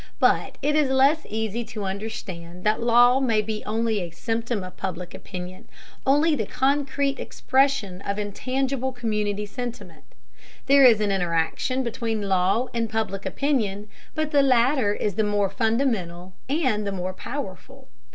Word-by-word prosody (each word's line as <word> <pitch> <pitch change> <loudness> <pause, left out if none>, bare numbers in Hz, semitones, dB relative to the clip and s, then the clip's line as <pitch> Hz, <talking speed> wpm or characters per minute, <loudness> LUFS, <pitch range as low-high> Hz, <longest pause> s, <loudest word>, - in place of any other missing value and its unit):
But - - +2
it 295 +1 +2
is 300 -3 +3
less 275 +4 +3
easy 220 +2 -2
to 220 -2 -6
understand 190 -4 -6
that 215 +2 +1
law 245 +2 +5
may 235 -5 +2
be 215 0 -2
only 220 0 0
a 175 -2 -4
symptom 225 +4 -2
of 185 0 -9
Public 180 -2 -5
Opinion, 180 -1 -8 0.4
only 295 +4 +4
the 220 -7 -2
concrete 275 +1 0
expression 260 -9 0
of 200 0 -3
intangible 260 +5 -2
community 210 -4 -1
sentiment. 240 +2 -7 0.6
There 275 +1 +6
is 230 -4 +7
an 205 -1 +1
interaction 180 +8 0
between 225 -2 -2
law 195 +4 +2
and 230 -1 -1
Public 215 -3 -2
Opinion, 215 -8 -1 0.3
but 310 -1 -1
the 285 -2 +5
latter 255 -3 +3
is 205 - -1
the 220 - +1
more 205 -2 +1
fundamental 200 -6 -1 0.2
and 260 -9 +1
the - - -1
more 185 -1 -3
powerful. 240 - -7
220 Hz, 150 wpm, -24 LUFS, 200-260 Hz, 0.6 s, is